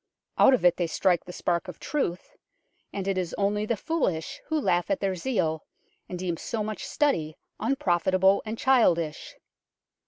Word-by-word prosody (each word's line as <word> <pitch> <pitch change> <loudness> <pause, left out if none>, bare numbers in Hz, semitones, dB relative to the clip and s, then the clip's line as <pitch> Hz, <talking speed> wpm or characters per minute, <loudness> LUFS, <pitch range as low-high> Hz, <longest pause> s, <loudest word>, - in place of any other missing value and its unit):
Out 265 - +7
of 230 - -3
it 175 0 +5
they 175 - 0
strike 175 +2 +1
the 180 - -8
spark 175 0 -1
of 180 - -9
truth, 185 - -3 0.6
and 195 -1 -4
it 195 -1 +1
is 180 -2 -3
only 210 +1 0
the 235 - 0
foolish 190 - -2
who 315 0 0
laugh 175 -10 +1
at 295 - +1
their 195 -1 0
zeal, 175 -7 -1 0.5
and 180 - -4
deem 175 -2 -2
so 220 +4 -3
much 215 0 -5
study 165 - 0 0.2
unprofitable 190 - +2
and 220 +1 -5
childish. 175 - +2
190 Hz, 165 wpm, -27 LUFS, 175-230 Hz, 0.6 s, Out